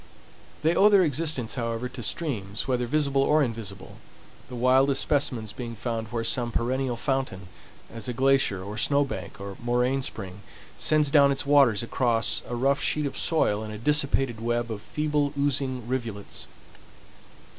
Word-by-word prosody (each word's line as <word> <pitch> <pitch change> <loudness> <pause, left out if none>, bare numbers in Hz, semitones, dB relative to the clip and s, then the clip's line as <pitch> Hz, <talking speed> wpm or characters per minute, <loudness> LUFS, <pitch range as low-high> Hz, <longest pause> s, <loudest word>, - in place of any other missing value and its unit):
They 160 +2 +3
owe 205 +4 +6
their 200 -3 +5
existence, 150 -6 -1
however, 115 -1 -3
to 125 0 -8
streams, 110 - -2
whether 125 -2 0
visible 140 0 +1
or 150 +2 +3
invisible, 110 -6 -6 0.5
the 125 - -7
wildest 130 +3 +3
specimens 125 -7 0
being 115 -2 -6
found 115 0 -4
where 115 +1 -3
some 120 0 +1
perennial 125 +2 -1
fountain, 115 -9 -2 0.4
as 115 +2 -5
a 125 - -2
glacier 130 -7 +2
or 105 +3 -6
snowbank 140 - -1
or 100 -1 -7
moraine 125 +3 +1
spring 100 -6 -6 0.3
sends 150 -2 +2
down 140 -2 +6
its 135 - -2
waters 135 -7 +4
across 115 -1 +1
a 120 - -4
rough 135 +3 +1
sheet 150 -1 0
of 140 - -4
soil 110 -11 +2
in 110 - -7
a 105 - -6
dissipated 135 -2 +1
web 120 0 -1
of 105 -2 -5
feeble, 150 0 -1
oozing 135 -4 -1
rivulets. 115 -6 -4
125 Hz, 155 wpm, -26 LUFS, 115-140 Hz, 0.5 s, owe